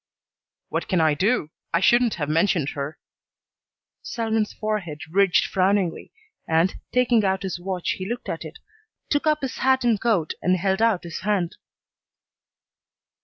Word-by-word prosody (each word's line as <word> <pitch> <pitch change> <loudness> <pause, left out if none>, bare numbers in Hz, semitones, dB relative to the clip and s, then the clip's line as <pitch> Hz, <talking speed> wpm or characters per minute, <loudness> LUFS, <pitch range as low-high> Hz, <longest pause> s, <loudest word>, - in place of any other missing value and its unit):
"What - - -2
can 185 - +1
I 160 -2 +4
do? 185 - +1 0.2
I - - +4
shouldn't 240 +4 +4
have 150 -3 -3
mentioned 160 -1 +2
her." 145 +4 -5 1.0
Selwyn's 220 -2 -1
forehead 205 -8 -3
ridged 195 0 +4
frowningly, 190 -2 0 0.4
and, 165 +3 +2 0.2
taking 245 -3 +3
out 190 -1 0
his 185 -2 -3
watch, 180 -1 -2
he 185 +1 -4
looked 240 +1 -4
at - - -4
it, - - -9 0.5
took 290 +1 +1
up 305 0 +2
his 270 -2 -4
hat 260 0 +2
and 230 -4 +2
coat, 205 -10 +1
and 185 +1 +3
held 190 +3 0
out 225 -5 +2
his 170 -2 -6
hand. 185 -2 -1
195 Hz, 150 wpm, -24 LUFS, 170-225 Hz, 1.0 s, I